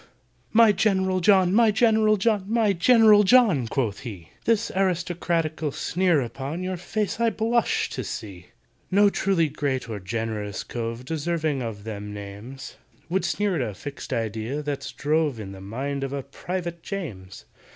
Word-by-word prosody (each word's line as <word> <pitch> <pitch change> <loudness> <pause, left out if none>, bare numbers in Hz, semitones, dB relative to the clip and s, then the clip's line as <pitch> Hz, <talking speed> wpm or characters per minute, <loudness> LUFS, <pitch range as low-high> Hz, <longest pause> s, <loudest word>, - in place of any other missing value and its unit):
"My 225 -1 +6
GENERAL 190 -2 +1
JOHN! 190 -1 +4
my 225 +1 +5
GENERAL 220 -1 +3
JOHN! 205 -1 +1
My 220 -2 +2
GENERAL 215 +2 +6
JOHN!" 195 - +4
quoth 115 -5 -1
he, 95 -9 -9 0.2
"This 230 0 +1
aristocratical 170 -4 0
sneer 175 0 +1
upon 135 +8 -5
Your 185 0 -2
face 210 +4 -3
I 235 0 +3
blush 230 +1 +1
to - - -4
see! 95 -5 -7 0.4
"No 200 +1 +4
truly 190 -6 +1
great 140 -3 -2
or 110 -3 -5
generous 105 0 -4
cove 115 +1 -5
Deserving 155 -2 -1
of 110 -4 -5
them 105 -1 -6
names, 105 +7 -9 0.3
Would 190 +3 0
sneer 205 -4 0
at - - -1
a 100 - -9
fixed 140 +8 -8
idea 115 +6 -2
that's 145 -1 -4
drove 150 -4 0
In 100 -3 -7
the 95 -1 -10
mind 135 +8 -4
of 135 0 -3
a 140 -1 -3
PRIVATE 170 +4 -5
JAMES!" 110 - -7
160 Hz, 155 wpm, -25 LUFS, -, 0.4 s, My